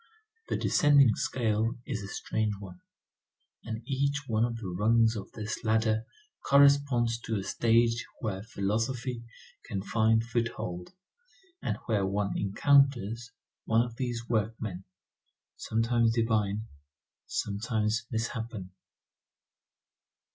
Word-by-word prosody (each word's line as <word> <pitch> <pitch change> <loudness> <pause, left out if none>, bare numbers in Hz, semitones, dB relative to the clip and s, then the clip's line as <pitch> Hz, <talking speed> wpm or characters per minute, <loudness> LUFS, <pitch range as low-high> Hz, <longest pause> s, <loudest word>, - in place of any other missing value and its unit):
The - - 0
descending 140 -5 +5
scale 115 -2 0
is 115 -6 -3
a 100 - -6
strange 105 +1 -2
one; 90 -3 -11 0.8
and 110 +1 -5
each 140 +1 0
one 110 -2 +1
of 120 -1 -1
the 110 -4 -6
rungs 110 +5 +3
of 100 - -7
this 105 -1 -5
ladder 110 0 +1 0.4
corresponds 140 -4 +4
to 115 -2 -3
a 95 - -3
stage 115 +2 +2 0.2
where 95 -4 -3
philosophy 115 +3 -2 0.4
can 95 -2 -4
find 110 +1 +2
foothold, 115 -7 -3 0.7
and - - -2
where 105 -4 +1
one 100 +1 -1
encounters 120 +1 +2 0.4
one 115 +1 +3
of 115 -1 -9
these 120 -2 -3
workmen, 110 -4 -2 0.7
sometimes 115 0 +1
divine, 110 -3 +1 0.6
sometimes 110 +2 -1
misshapen. 110 -4 -4
115 Hz, 110 wpm, -29 LUFS, 105-120 Hz, 0.8 s, descending